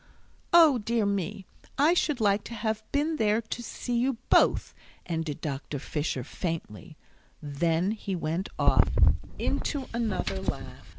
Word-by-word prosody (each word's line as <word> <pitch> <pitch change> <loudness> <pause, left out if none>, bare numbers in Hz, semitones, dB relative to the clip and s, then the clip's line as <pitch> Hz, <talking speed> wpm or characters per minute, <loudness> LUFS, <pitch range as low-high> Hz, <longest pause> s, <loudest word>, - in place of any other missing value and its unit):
O 320 -7 +7
dear 225 0 0
me, 200 0 -2 0.3
I 300 +5 +5
should 300 -6 +1
like 205 -1 +2
to 235 - -7
have 220 -1 -2
been 305 +3 0
there 215 -2 +2
to 230 +1 -5
see 240 +1 -4
you 255 0 +1
both," - - +4 0.3
ended 160 -3 -3
Dr. 145 -1 -4
Fisher, 145 -2 -3
faintly. 160 - -5 0.4
Then 165 +5 0
he 200 -3 -3
went 165 +3 -2
off - - +4 0.5
into 280 -4 -2
another 210 -4 -1
laugh. - - -5
205 Hz, 135 wpm, -28 LUFS, 165-235 Hz, 0.5 s, O